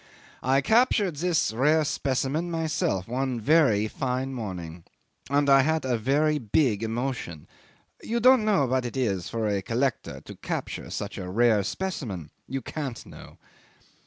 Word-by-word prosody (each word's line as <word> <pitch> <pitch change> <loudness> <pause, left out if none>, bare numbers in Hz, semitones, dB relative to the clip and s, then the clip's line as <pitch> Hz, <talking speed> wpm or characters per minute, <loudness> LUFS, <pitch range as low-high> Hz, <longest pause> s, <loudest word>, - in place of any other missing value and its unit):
"I 135 +2 +2
captured 205 - +2
this 165 -8 +1
rare 150 +7 +3
specimen 140 +3 -1
myself 160 - -1
one 130 0 -2
very 120 -5 +3
fine 130 +3 -3
morning. 90 -8 -6 0.5
And 140 +1 +2
I 135 -1 +7
had 160 +1 0
a 125 -2 +1
very 145 +6 +1
big 115 -2 +1
emotion. 115 - -4 0.5
You 235 +1 -2
don't 255 0 +6
know 205 -10 +3
what 130 0 0
it 120 +2 -5
is 100 -9 -1
for 115 -2 -2
a 100 -2 0
collector 120 +5 -2
to - - -11
capture - - -5
such 100 0 -5
a 90 -1 -5
rare 110 +1 +3
specimen. 105 - -4 0.2
You 135 -1 -4
can't 135 -6 -5
know." - - -13
130 Hz, 150 wpm, -26 LUFS, 110-150 Hz, 0.5 s, I